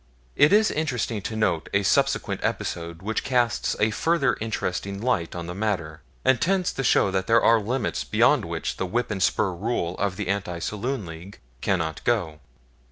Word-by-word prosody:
It 145 Hz, -, +5 dB
is 215 Hz, +1 st, +5 dB
interesting 125 Hz, -8 st, -2 dB
to 110 Hz, -, -5 dB
note 90 Hz, -7 st, 0 dB
a 100 Hz, -, +3 dB
subsequent -, -, +1 dB
episode 85 Hz, +1 st, -3 dB
which 110 Hz, +2 st, -2 dB
casts 125 Hz, -3 st, +1 dB
a 110 Hz, +1 st, +3 dB
further 140 Hz, +1 st, +1 dB
interesting 100 Hz, -3 st, -3 dB
light 105 Hz, -9 st, -1 dB
on 85 Hz, -1 st, -5 dB
the 85 Hz, -, -5 dB
matter, 90 Hz, -7 st, -2 dB, 0.2 s
and 130 Hz, -2 st, +3 dB
tends 185 Hz, 0 st, +1 dB
to 135 Hz, -, -3 dB
show 100 Hz, -, +3 dB
that 95 Hz, 0 st, -1 dB
there 115 Hz, 0 st, +4 dB
are 115 Hz, 0 st, +5 dB
limits 115 Hz, +2 st, -2 dB
beyond -, -, +3 dB
which -, -, -4 dB
the 95 Hz, -, -2 dB
whip 120 Hz, +4 st, -1 dB
and 95 Hz, -2 st, -3 dB
spur 100 Hz, +1 st, +2 dB
rule 90 Hz, -2 st, -2 dB
of 100 Hz, -2 st, 0 dB
the 105 Hz, -1 st, -4 dB
Anti 95 Hz, -3 st, -2 dB
Saloon 105 Hz, +6 st, -3 dB
League 85 Hz, +4 st, -10 dB, 0.2 s
cannot 80 Hz, -5 st, -1 dB
go. 90 Hz, -11 st, 0 dB
105 Hz, 180 wpm, -25 LUFS, 90-120 Hz, 0.2 s, It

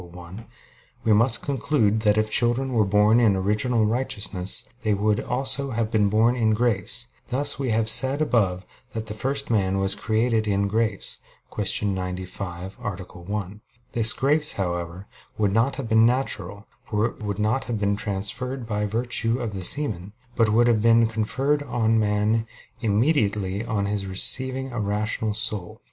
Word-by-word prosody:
1), 90 Hz, +5 st, -11 dB, 0.6 s
we 110 Hz, -, +3 dB
must 115 Hz, +3 st, +3 dB
conclude 130 Hz, -6 st, +1 dB
that 105 Hz, -1 st, +2 dB
if 110 Hz, 0 st, +1 dB
children 125 Hz, +4 st, +2 dB
were 110 Hz, -3 st, +3 dB
born 105 Hz, +3 st, +4 dB
in 110 Hz, -5 st, +4 dB
original 105 Hz, +4 st, +1 dB
righteousness, 100 Hz, -5 st, -2 dB
they 110 Hz, -3 st, +1 dB
would 105 Hz, +1 st, +1 dB
also 135 Hz, +2 st, 0 dB
have 115 Hz, -2 st, -2 dB
been 105 Hz, -3 st, +3 dB
born 110 Hz, +4 st, +3 dB
in 110 Hz, -3 st, +2 dB
grace; 110 Hz, -, -1 dB, 0.2 s
thus 135 Hz, +2 st, 0 dB
we 135 Hz, -2 st, -1 dB
have 110 Hz, 0 st, +1 dB
said 135 Hz, +5 st, +2 dB
above 100 Hz, -11 st, +1 dB, 0.3 s
that 110 Hz, -2 st, -4 dB
the 105 Hz, -, -5 dB
first 135 Hz, +4 st, -1 dB
man 95 Hz, -3 st, +1 dB
was 95 Hz, 0 st, +2 dB
created 110 Hz, 0 st, 0 dB
in 100 Hz, 0 st, +1 dB
grace 110 Hz, -1 st, -1 dB, 0.4 s
(Q. 105 Hz, 0 st, +1 dB
95, 90 Hz, 0 st, -5 dB
A. -, -, -3 dB
1). 95 Hz, +2 st, -6 dB, 0.3 s
This 115 Hz, -1 st, +3 dB
grace, 150 Hz, +3 st, +2 dB
however, 90 Hz, 0 st, -4 dB, 0.3 s
would 105 Hz, -2 st, +1 dB
not 120 Hz, +5 st, +2 dB
have 130 Hz, -3 st, -5 dB
been 110 Hz, 0 st, +5 dB
natural, 105 Hz, -6 st, -2 dB, 0.2 s
for 105 Hz, 0 st, +1 dB
it 115 Hz, -, -5 dB
would 100 Hz, -2 st, -3 dB
not 110 Hz, +5 st, 0 dB
have 115 Hz, -3 st, -3 dB
been 100 Hz, 0 st, +1 dB
transfused 110 Hz, +6 st, -3 dB
by 105 Hz, -1 st, -2 dB
virtue 115 Hz, +2 st, 0 dB
of 115 Hz, -4 st, -4 dB
the 95 Hz, -2 st, -5 dB
semen; 105 Hz, -6 st, -1 dB, 0.2 s
but 115 Hz, -2 st, +3 dB
would 115 Hz, +3 st, +4 dB
have 115 Hz, -3 st, +3 dB
been 115 Hz, +1 st, +5 dB
conferred 130 Hz, +6 st, 0 dB
on 115 Hz, -5 st, +1 dB
man 105 Hz, +2 st, +1 dB, 0.3 s
immediately 105 Hz, -4 st, +1 dB
on 110 Hz, -4 st, -1 dB
his 100 Hz, -1 st, -2 dB
receiving 130 Hz, +7 st, -1 dB
a 120 Hz, -, -4 dB
rational 105 Hz, +1 st, -1 dB
soul. 110 Hz, -5 st, -2 dB
110 Hz, 165 wpm, -24 LUFS, 100-120 Hz, 0.6 s, been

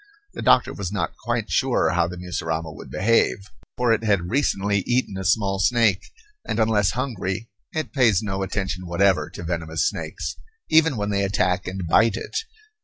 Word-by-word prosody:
The -, -, -6 dB
doctor -, -, +4 dB
was 95 Hz, -3 st, -4 dB
not 105 Hz, -, -2 dB
quite 120 Hz, -2 st, -3 dB
sure 130 Hz, -2 st, +2 dB
how 85 Hz, -1 st, +2 dB
the 90 Hz, +1 st, -7 dB
mussurama 80 Hz, -2 st, -3 dB
would -, -, -11 dB
behave, 115 Hz, +5 st, +2 dB, 0.4 s
for 125 Hz, -2 st, +3 dB
it 115 Hz, -, -1 dB
had 100 Hz, -5 st, +1 dB
recently 100 Hz, -7 st, +1 dB
eaten 120 Hz, -5 st, 0 dB
a 95 Hz, -, -4 dB
small 95 Hz, 0 st, +1 dB
snake, 110 Hz, -1 st, +3 dB, 0.4 s
and 110 Hz, -, -3 dB
unless 105 Hz, -4 st, +2 dB
hungry 115 Hz, -5 st, -3 dB, 0.2 s
it 155 Hz, -3 st, -3 dB
pays 115 Hz, -8 st, +3 dB
no 95 Hz, -2 st, -3 dB
attention 95 Hz, -2 st, -3 dB
whatever 95 Hz, +2 st, +2 dB
to -, -, -9 dB
venomous 80 Hz, -1 st, -1 dB
snakes, 70 Hz, +1 st, -4 dB, 0.3 s
even 160 Hz, -4 st, +4 dB
when 105 Hz, 0 st, -1 dB
they 100 Hz, 0 st, +1 dB
attack 90 Hz, -2 st, 0 dB
and 95 Hz, 0 st, -4 dB
bite 110 Hz, +5 st, +4 dB
it. 115 Hz, -, -7 dB
100 Hz, 175 wpm, -23 LUFS, 90-115 Hz, 0.4 s, doctor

